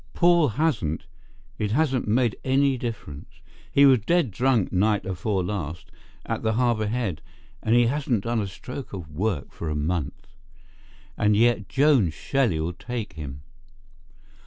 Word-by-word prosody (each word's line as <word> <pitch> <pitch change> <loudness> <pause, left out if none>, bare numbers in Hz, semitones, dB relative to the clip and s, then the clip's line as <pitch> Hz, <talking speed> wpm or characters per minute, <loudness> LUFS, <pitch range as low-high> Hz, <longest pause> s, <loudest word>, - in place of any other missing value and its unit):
Paul 170 -3 +5
hasn't. 110 - 0 0.5
It 105 -1 -1
hasn't 135 -4 +1
made 115 0 +2
any 135 +1 +2
difference. 110 - -6 0.4
He 140 - +6
was 130 -3 +6
dead 155 - +1
drunk 120 -1 +1
night 105 +3 +2
afore 95 +1 -1
last 85 -4 -5 0.3
at - - -3
the 110 0 0
Harbour 115 -2 +1
head, 105 -9 -2 0.4
and 110 - +2
he 120 0 +5
hasn't 125 -5 0
done 115 0 0
a 100 - -3
stroke 125 +6 -8
of 85 -6 -7
work 90 -3 -2
for 85 - -5
a 75 - -2
month. 75 -1 -2 0.9
And 105 0 +3
yet 115 -2 +2
Joan 135 - +4
Shelley'll 85 - -1
take 115 +3 -5
him." 70 -2 -8
110 Hz, 145 wpm, -25 LUFS, 90-130 Hz, 0.9 s, He